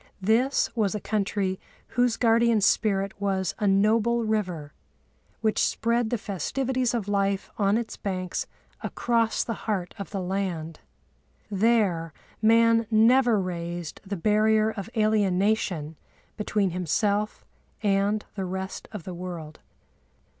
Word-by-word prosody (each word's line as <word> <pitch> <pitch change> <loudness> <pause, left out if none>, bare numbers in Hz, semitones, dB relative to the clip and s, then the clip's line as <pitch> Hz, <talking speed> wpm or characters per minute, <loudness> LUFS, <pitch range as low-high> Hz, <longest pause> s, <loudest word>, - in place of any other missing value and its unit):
This 240 +8 +2
was 215 -3 +1
a - - -2
country 200 -2 -1 0.3
whose 245 -1 +1
guardian 230 -1 +4
spirit 200 -1 +2
was 190 -3 0
a 210 - +1
noble 220 +4 +3
river, 180 -9 -2 0.7
which 220 -1 +2
spread 235 0 +1
the 240 - 0
festivities 250 - -1
of 215 -4 -2
life 200 -1 0
on 200 +1 +3
its 235 -1 -4
banks 185 -2 -3 0.3
across 230 -2 0
the 230 - -3 0.2
heart 185 -4 -1
of 200 - -5
the 200 - -3
land. 180 -4 -3 0.7
There 195 -6 +2 0.3
man 230 0 +4
never 230 +1 +5
raised 175 -2 -4
the 200 -1 -4
barrier 215 +3 +3
of 215 -1 -6
alienation 200 -6 +1 0.4
between 205 -3 0
himself 200 +5 -1 0.4
and 205 +1 +1
the 195 -2 -3
rest 190 +1 -5
of 210 -6 -7
the 185 - -6
world. 170 -3 -7
205 Hz, 125 wpm, -26 LUFS, 185-225 Hz, 0.7 s, never